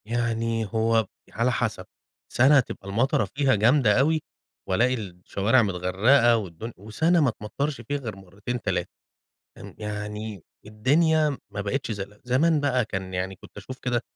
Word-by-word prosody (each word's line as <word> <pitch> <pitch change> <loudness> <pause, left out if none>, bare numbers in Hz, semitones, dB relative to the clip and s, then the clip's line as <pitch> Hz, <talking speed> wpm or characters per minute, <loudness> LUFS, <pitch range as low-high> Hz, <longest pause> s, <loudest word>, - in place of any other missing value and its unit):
يعني 115 0 -1
هو 110 +1 +1 0.2
على 115 +3 +1
حسب، 110 -6 -2 0.5
سنة 135 +3 +6
تبقى 105 -5 -5
المطرة 110 +2 +1
فيها 135 -2 +3
جامدة 110 +1 +4
أوي، 155 +3 +2 0.5
وألاقي 120 +7 +3
الشوارع 100 +2 0
متغرقة 105 +6 +3
والدن 105 +2 -6
وسنة 150 - +1
ما 140 -5 +3
تمطرش 135 +6 -3
فيها 145 +5 -3
غير 120 -7 -6
مرتين 100 +6 -6
3 - - -1 0.7
ان - - -11
يعني 105 -2 -5 0.2
الدنيا 150 +7 +2 0.2
ما 100 - -3
بقتش 120 +5 -2
زي 100 -3 -3 0.2
زمان 150 +6 +2
بقى 130 -4 +1
كان 95 -3 -5
يعني 95 +1 -3
كُنت - - -16
أشوف 130 +6 -8
كده 120 -2 -1
115 Hz, 145 wpm, -25 LUFS, 105-130 Hz, 0.7 s, سنة